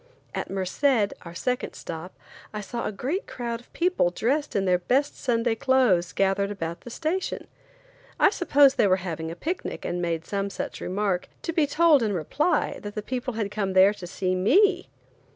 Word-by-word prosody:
At - - -4
Merced, 205 +4 +1
our 170 0 -9
second 250 +7 -2
stop, 165 +3 -7 0.4
I - - -2
saw 235 +3 -4
a - - -2
great 270 - -3
crowd 235 -2 -4
of 245 - -21
people 355 - +2
dressed 275 - -1
in 195 -1 +1
their 180 -1 +3
best 270 +10 +1
Sunday 235 -2 0
clothes 225 -8 +2
gathered 195 0 +1
about 170 -4 -5
the - - -10
station. 330 +9 -2 0.7
I - - +6
supposed 285 -8 +4
they - - +5
were 185 - +4
having 160 -2 -4
a 165 - -6
picnic 340 - -4
and 175 0 -2
made 165 -2 -2
some 200 +1 -2
such - - -5
remark, 190 -1 -1
to 330 - -2
be 315 -3 +2
told 310 -1 +5
in 215 -3 0
reply 280 - 0
that 205 0 -7
the 210 - -3
people 255 +1 -3
had 210 -3 -2
come 195 -3 -2
there 190 +2 +6
to 185 -4 -9
see 185 +1 -1
me. 360 - +3
210 Hz, 190 wpm, -26 LUFS, 185-275 Hz, 0.7 s, I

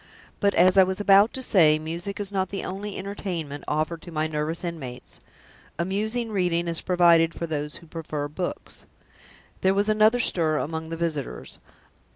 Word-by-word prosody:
But, 200 0 +2
as 185 +2 +5
I - - +9
was 185 +1 -2
about 205 +1 +5
to 260 - -3
say, 160 -9 +5
music 170 +6 -5
is 205 -1 -1
not 190 -2 -1
the 195 - -4
only 195 +2 -5
entertainment 175 -7 -5
offered 155 +2 -1
to 175 - -11
my 155 -1 -1
nervous 155 +2 -2
inmates. 150 -8 -7 0.6
Amusing 215 +7 -2
reading 175 -4 0
is 165 -1 0
provided 170 -2 +4
for 170 - -3
those 150 -2 -4
who - - -9
prefer 155 -3 -5
books." 175 +5 -6 0.7
There 190 +1 +3
was 205 +2 +1
another 215 +3 +4
stir 160 -9 +2
among 160 +2 -4
the 165 - -4
visitors. 160 -4 -4
170 Hz, 170 wpm, -25 LUFS, 160-195 Hz, 0.7 s, I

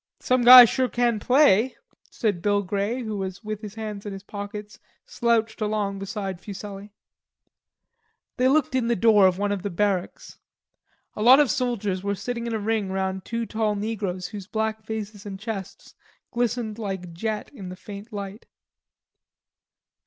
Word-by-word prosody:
"Some 255 0 +1
guy 250 0 +12
sure 255 +2 0
can 240 -2 +1
play," 255 -1 +4 0.3
said 205 -6 -1
Bill 205 +1 +1
Grey 205 +6 -2
who, 215 -2 -4 0.3
with 215 -1 -5
his 210 -1 -8
hands 215 -2 -6
in 205 - -6
his 195 0 -9
pockets, 205 +1 -8 0.3
slouched 230 -2 0
along 210 -2 -1
beside 195 -2 -5
Fuselli. 200 0 -8 1.5
They 255 - +3
looked 280 0 +2
in 255 -3 +1
the 235 - +2
door 210 -2 +5
of 185 -1 0
one 205 +1 -1
of 200 -2 -2
the 205 - -3
barracks. 190 0 -2 0.8
A - - -5
lot 255 +5 +8
of 290 -5 +4
soldiers 215 -7 -1
were 200 0 -1
sitting 235 +3 -4
in 230 - -3
a - - -1
ring 210 -2 -1
round 190 0 -2
two 230 0 -3
tall 220 -2 -1
negroes 200 -4 -3
whose 200 -3 -8
black 220 0 -2
faces 215 -2 -6
and 195 -1 -7
chests 210 -3 -7 0.4
glistened 235 -2 -2
like 190 -5 -5
jet 215 +4 -4
in 195 -9 -8
the 180 - -7
faint 205 +4 -10
light. 200 +1 -7
210 Hz, 160 wpm, -25 LUFS, 200-230 Hz, 1.5 s, guy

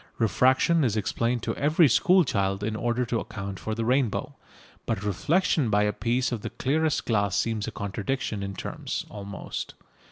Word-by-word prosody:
Refraction 130 - +3
is 110 -4 +1
explained 115 +3 -1
to 115 - -2
every 155 +3 +4
school 185 - +5
child 100 -6 -1
in 110 +1 -1
order 120 +2 0
to 115 -1 -1
account 100 -3 -6
for 110 - -3
the 115 0 -2
rainbow. 125 -2 0 0.5
But 95 - -1
reflection 145 - +1
by 105 0 +3
a 105 0 +1
piece 120 +5 0
of 120 -4 -3
the - - -4
clearest 155 +3 0
glass 100 -4 +1
seems 110 -2 0
a - - -3
contradiction 105 +3 -3
in 100 0 -4
terms - - -4
almost. 100 -1 -6
115 Hz, 170 wpm, -26 LUFS, 100-130 Hz, 0.5 s, school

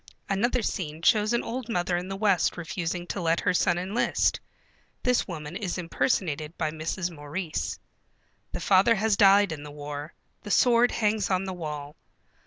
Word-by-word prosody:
Another 235 +5 +1
scene 160 -6 -3
shows 215 +2 +4
an 235 - +1
old 240 +1 -5
mother 180 -4 0
in 175 +1 -3
the 195 - -4
West 195 -5 +2
refusing 175 +1 -3
to 180 - -4
let 165 0 +2
her 180 - +1
son 175 -1 +2
enlist. 190 +6 +1 0.6
(This 250 -1 +2
woman 155 -3 -6
is 185 -3 -3
impersonated 165 - -1
by 155 -2 -1
Mrs. 165 +3 -3
Maurice.) 155 +2 -4 0.7
The - - -5
father 200 +4 +5
has 215 0 +2
died 200 -1 +6
in 155 -2 -5
the 150 - -8
war. 145 +1 -7 0.3
The 210 - -9
sword 240 +3 +5
hangs 210 -2 0
on 185 -1 +1
the 190 -1 -4
wall. 150 -4 -6
180 Hz, 170 wpm, -27 LUFS, 160-205 Hz, 0.7 s, died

